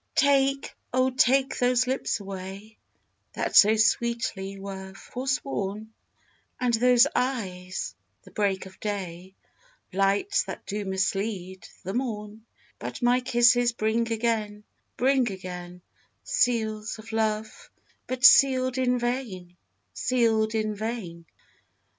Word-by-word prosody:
Take, 275 -2 +2 0.2
O, 255 +1 +2
take 265 +1 +2
those 250 0 +3
lips 260 -2 -1
away, 195 +2 -8 0.5
That - - -3
so 215 +2 +8
sweetly 215 -3 0
were 190 -1 -8
forsworn; 220 -5 -4 0.7
And 250 -1 +1
those 245 +1 +5
eyes, 190 -8 -3 0.3
the - - -16
break 195 -3 -1
of 190 0 -14
day, 190 -3 -5 0.6
Lights 200 - +2
that - - -8
do 205 0 -4
mislead 190 0 -2 0.2
the 190 +1 -4
morn: 220 -3 -4 0.3
But - - -6
my 245 +1 +4
kisses 240 -1 +3
bring 230 +1 0
again, 220 -2 -1 0.3
bring 260 -2 +2
again; 180 -1 -8 0.4
Seals 225 - 0
of 220 +1 -11
love, 220 -1 -2 0.4
but 255 +1 0
sealed 260 -2 +6
in 250 -1 +2
vain, 235 -8 -4 0.4
sealed 225 -3 +1
in 215 -1 0
vain. 205 -6 -5
220 Hz, 110 wpm, -26 LUFS, 195-250 Hz, 0.7 s, so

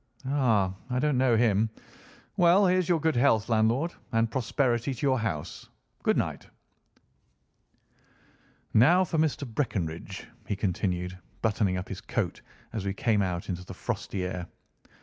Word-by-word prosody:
"Ah! 115 -9 +2 0.2
I 125 - -1
don't 150 +2 +2
know 125 -3 +4
him. 110 -1 +3 0.7
Well, 180 +3 +5
here's 185 -1 +2
your 170 -2 +3
good 160 0 +1
health 120 -3 +3
landlord, 115 +9 +2 0.2
and 115 -1 +1
prosperity 125 +1 0
to 135 - -3
your 130 -2 +3
house. 100 -10 -4 0.3
Good - - +2
night." - - -2 2.3
"Now 170 +12 +6
for 165 -3 -1
Mr. 150 -3 0
Breckinridge," 95 - -3 0.2
he 100 - -1
continued, 90 -2 -2 0.2
buttoning 105 -4 +1
up 90 - -5
his - - -6
coat - - -2 0.3
as 110 -4 -3
we 100 0 -2
came 110 -2 +2
out 90 -2 -2
into 90 -1 -4
the - - -9
frosty 95 -2 -3
air. 90 -1 -4
115 Hz, 145 wpm, -28 LUFS, 95-140 Hz, 2.3 s, Now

